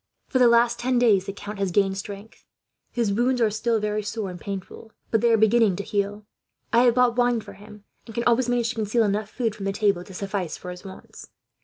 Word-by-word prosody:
"'For 260 - +1
the 250 - +6
last 235 0 +3
ten 250 +1 +1
days, 210 -6 +3
the - - -2
count 205 +1 -8
has 195 -1 0
gained 195 +1 +1
strength. 200 +2 -9 0.5
His 230 -5 -1
wounds 245 +4 +1
are 225 -3 +3
still 225 +2 0
very 210 0 -1
sore 210 -2 -4
and 175 - -10
painful, 200 +2 -7 0.2
but 225 - +2
they 235 - +3
are 225 - +5
beginning 220 -2 +4
to 200 - -4
heal. 205 0 -2 0.5
I 235 - +6
have 240 -1 +4
bought 250 -1 +3
wine 245 -1 +2
for - - -11
him, 210 0 -14 0.2
and 225 - -10
can 235 - -1
always 240 +1 +2
manage 240 -1 +1
to 235 - -4
conceal 220 +2 +1
enough 210 0 -1
food, 225 -1 -2
from 205 -2 -7
the 195 - 0
table, 200 -3 +1
to 190 - -12
suffice 195 -3 -3
for 180 - -8
his 180 0 -10
wants. 190 -1 -12
215 Hz, 235 wpm, -24 LUFS, 200-235 Hz, 0.5 s, the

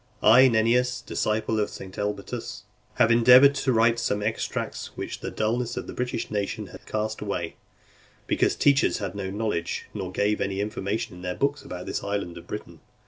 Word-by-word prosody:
3. - - +5
I, 125 +4 +8
Nennius, 125 +2 +2
disciple 110 -2 -1
of 105 - 0
St. 95 -1 -9
Elbotus, 105 -1 -4 0.3
have 115 - +4
endeavoured 125 +4 +8
to 135 -1 0
write 115 0 +3
some 105 -3 -1
extracts 110 +1 -3
which - - -5
the - - -4
dulness 120 +2 -1
of - - -3
the - - -7
British 125 -2 -3
nation 100 -2 -2
had - - -13
cast 110 0 -2
away, 90 -5 -3 0.7
because - - +1
teachers 140 -1 +3
had 100 -3 -4
no 100 -2 -4
knowledge, 100 -4 -2
nor 95 -3 -4
gave 105 +3 0
any 95 0 -1
information 105 +1 -3
in 90 - -11
their 90 0 -3
books 140 +1 0
about 90 0 -7
this - - -3
island 100 -4 -3
of - - -16
Britain. - - -7
110 Hz, 185 wpm, -26 LUFS, 100-120 Hz, 0.7 s, I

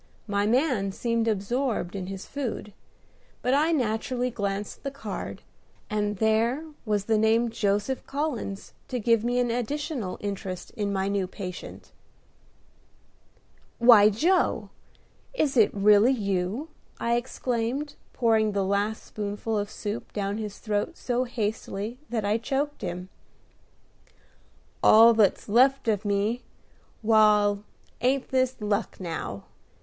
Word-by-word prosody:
My 200 -1 0
man 240 -5 +2
seemed 230 +2 -1
absorbed 220 -1 -1
in 185 -2 -4
his 195 0 -6
food; 240 -7 -5 0.7
but 250 - +2
I 305 +4 +3
naturally 245 -2 0
glanced 200 -2 -3
at - - -32
the 275 - -2
card, 275 0 -6 0.5
and 210 -1 -1
there 225 +8 +1 0.2
was 205 -2 0
the 220 -1 +2
name 225 +2 +3
"Joseph 210 +3 -1
Collins" 275 -9 -3
to 250 - -3
give 230 -1 +3
me 245 +1 0
an 245 -1 +2
additional 245 - -3
interest 195 -3 -5
in 205 -2 -2
my 195 -1 0
new 200 -2 0
patient. 180 -1 -8 1.9
"Why, 230 -4 +8
Joe! 335 - +1 0.6
is 290 - +1
it 225 -4 +5
really 210 +5 +5
you?" 200 - -2 0.3
I 235 0 +1
exclaimed, 250 +3 -2 0.2
pouring 220 -3 +2
the 200 -1 0
last 200 +3 0
spoonful 210 +1 -4
of 205 -1 -1
soup 215 0 -5
down 205 0 -2
his 210 -2 -5
throat 215 +9 -2
so 250 0 -1
hastily 220 -1 -3
that 225 -3 -1
I 210 +3 +1
choked 280 +5 -2
him. 180 +1 -5 1.7
"All 225 +2 +8
that's 215 -3 +2
left 260 +5 +4
of 210 -1 +1
me. 205 +4 0 0.6
Wal, 210 -2 +4 0.4
ain't 260 +2 +1
this 260 -1 +1
luck, 205 -1 -1
now?" 160 - -5
220 Hz, 130 wpm, -26 LUFS, 205-245 Hz, 1.9 s, Why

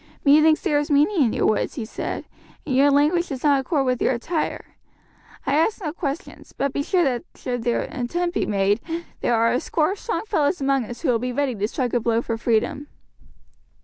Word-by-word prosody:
"Methinks 310 +2 +5
there 290 - +2
is 290 - -3
meaning 300 +5 +3
in 225 - +1
your - - 0
words," 215 - 0
he 240 -7 -4
said, 215 - -5 0.4
"and 265 - -1
your 280 +2 +5
language 300 +5 +3
does 265 -2 -5
not 285 -2 +4
accord 275 0 0
with 250 -1 0
your - - +2
attire. 310 +7 -3 0.7
I 275 - 0
ask 330 +9 +2
no 310 -7 -4
questions; 295 -2 -6
but 275 -1 -1
be - - -1
sure 355 +5 +1
that 250 -5 0
should 245 -2 -4
an 240 +2 -1
attempt 345 +7 -2
be - - -1
made, 200 +2 +1 0.4
there 240 - +1
are 230 +1 +3
a 250 - +2
score 310 +4 0
of 395 - -5
strong 460 - -3
fellows 355 -5 +1
among 270 -2 +1
us 240 +2 -9
who 320 - 0
will 235 -2 +3
be 250 +2 -2
ready 275 0 0
to 210 -1 -1
strike 245 +1 -2
a 245 - +3
blow 230 0 0
for 230 - -2
freedom." 240 +6 0
275 Hz, 215 wpm, -23 LUFS, 240-310 Hz, 0.7 s, Methinks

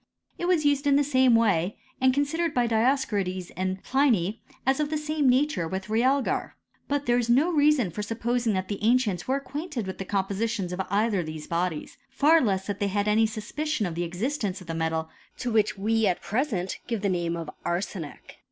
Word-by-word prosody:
It 350 - -1
was 345 -4 +2
used 285 0 +2
in 280 - +5
the 290 - +4
same 260 -3 +4
way, 200 -5 +2 0.2
and 260 0 +5
considered 295 +5 0
by 245 -1 +3
Dioscorides 220 -6 0
and 185 +1 -3
Pliny 235 -7 +1 0.2
as 265 +2 +2
of 300 -1 0
the 310 - -1
same 300 -2 +1
nature 255 - +2
with 190 +4 -5
realgar. 255 +4 +1 0.3
But 285 0 -1
there 240 0 +3
is 240 -1 -2
no 285 +9 +4
reason 290 - +3
for 210 - -4
supposing 230 +1 -1
that 185 -1 -2
the 205 0 -4
ancients 225 -6 +2
were 265 +1 +2
ac 275 - -19
quainted 290 - -4
with 190 - -6
the 195 - -4
compositions 195 -1 -1
of 185 - -2
either 205 +1 +1
of 170 - -3
these 155 -1 -6
bodies; 170 -2 -3
far 300 +5 +4
less 190 -5 0
that 205 -1 -4
they 205 - +1
had 205 +1 -1
any 220 +1 +4
suspicion 225 +4 -3
of 175 - -3
the 170 +2 -2
existence 200 - -2
of 185 - -12
the 165 - -5
metal 160 0 -1 0.3
to 245 - -3
which 215 -2 +2
we 220 +2 +1
at 180 - +1
present 210 -6 -2
give 230 -4 -2
the 200 - +2
* 185 - +1
name 170 0 -2
of 165 -2 -6
arsenic. 175 -3 -5
220 Hz, 210 wpm, -26 LUFS, 185-270 Hz, 0.3 s, in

